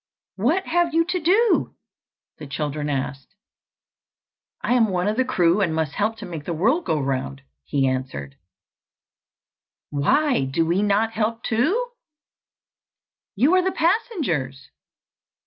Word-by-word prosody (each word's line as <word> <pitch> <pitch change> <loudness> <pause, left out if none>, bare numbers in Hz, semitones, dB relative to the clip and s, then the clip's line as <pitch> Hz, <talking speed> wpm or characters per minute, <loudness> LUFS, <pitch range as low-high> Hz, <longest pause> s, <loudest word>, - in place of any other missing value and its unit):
"What 305 - +1
have 345 -1 +1
you 330 0 +4
to 360 +1 -1
do?" 405 +8 +2 0.6
the 150 - -8
children 150 +1 -3
asked. 135 +4 -4 1.3
"I 240 - +1
am 235 -3 +4
one 180 0 0
of 210 - 0
the 260 - +2
crew, 180 -6 +2
and 170 -5 +1
must 160 -3 -1
help 215 +5 -1
to - - -8
make 160 -4 -7
the 170 - -3
world 245 - +1
go 155 - 0
round," 130 - -3 0.2
he 135 - +1
answered. 130 - -3 1.6
"Why 255 - +2
do 150 +5 0
we 175 +4 +1
not 210 +2 +2
help 225 +1 -2
too?" 345 - +1 1.5
"You 265 - +3
are 370 - +5
the 375 - +1
passengers." 295 - -1
200 Hz, 135 wpm, -23 LUFS, -, 1.6 s, are